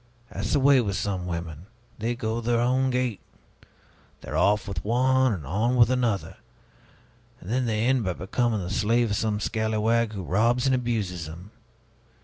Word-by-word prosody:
That's 105 +2 -3
the - - +3
way 135 -1 +5
with 100 -4 -2
some 95 -2 -2
women 85 0 -6 0.3
they 115 +3 -1
go 115 0 -3
their 120 0 +1
own 130 +2 +2
gait, 125 -4 -1 1.0
they're - - -6
off 105 0 +2
with 95 -5 -4
one 130 +3 +2
and 85 -9 -4
on 110 - 0
with 120 -1 +5
another, 120 -6 -1 1.0
and 95 - -8
then 125 +1 +1
they 110 0 0
end 130 -1 +2
by 95 -2 -1
becoming 110 +4 -1
the 90 +1 -5
slave 115 +2 +1
of - - +1
some 105 0 -1
scalawag 110 +1 0
who 95 -3 -5
robs 115 +8 +1
and 135 - +3
abuses 105 -10 -2
them! 85 +6 -11
110 Hz, 170 wpm, -25 LUFS, 100-120 Hz, 1.0 s, way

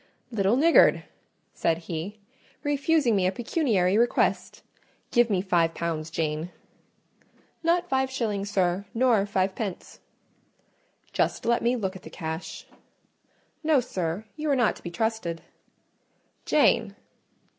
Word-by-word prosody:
"Little 205 -1 +2
niggard!" 320 +5 +5 0.5
said 165 - +1
he, 170 +4 -6 0.5
"refusing 290 -4 +2
me 185 -2 +2
a - - +1
pecuniary 215 - +1
request! 240 +1 0 0.5
Give 240 -1 +4
me 190 -3 +1
five 170 -4 +1
pounds, 165 -2 -3
Jane." 155 +1 -2 1.1
"Not 345 +2 +1
five 265 -4 +1
shillings, 210 -6 -2
sir; 185 -1 0
nor 235 -4 +3
five 190 -1 0
pence." 195 -3 -6 1.1
"Just - - 0
let 235 0 +2
me 240 +2 +2
look 195 -5 -3
at 190 - -9
the 160 - -11
cash." 160 +1 -6 1.0
"No, 305 -3 +4
sir; 185 -4 -3
you 305 0 -3
are 280 - +3
not 240 -4 +2
to - - -16
be 175 - -6
trusted." 175 -3 -2 1.0
"Jane!" - - +3
205 Hz, 125 wpm, -26 LUFS, 175-245 Hz, 1.1 s, niggard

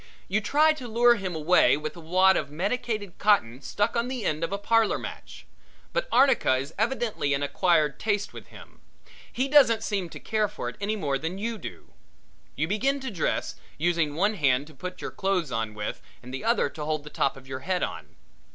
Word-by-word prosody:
You 210 +3 +1
try 305 +7 +4
to 260 -5 -8
lure 240 +1 +5
him 190 -6 -4
away 160 -1 +4
with 155 +3 -5
a - - -10
wad 185 +4 +4
of 140 - -1
medicated 205 - -3
cotton 140 - +2
stuck 205 - -1
on 235 +1 0
the 255 -4 -4
end 155 +1 -1
of 165 - -2
a 200 - -1
parlor 225 +2 +2
match. - - -9 0.5
But - - 0
arnica 260 - +4
is 135 +4 -4
evidently 220 - 0
an 140 - -2
acquired 155 -1 +2
taste 205 -2 -1
with - - -10
him. - - -15 0.5
He 260 +3 -1
doesn't 255 -6 +5
seem 195 -6 -2
to - - -9
care 215 -1 0
for - - -6
it - - -10
any 210 +2 0
more 140 -9 -1
than 165 +5 -4
you 225 +2 -3
do. - - -9 0.6
You 155 +4 -1
begin 265 +9 +1
to 265 -2 -4
dress, 175 -6 -1 0.2
using 165 -2 +1
one 205 +6 +2
hand 140 -7 +2
to 155 - -15
put 180 +6 -7
your - - -5
clothes 190 -7 -1
on 110 -1 -2
with 105 0 -4 0.2
and 125 +1 -9
the 135 - -5
other 235 -7 +3
to 150 - -7
hold 155 -1 -2
the 150 - -10
top 135 - 0
of 130 0 -14
your 130 0 -5
head 180 +6 -1
on. - - -6
190 Hz, 210 wpm, -26 LUFS, 150-225 Hz, 0.6 s, lure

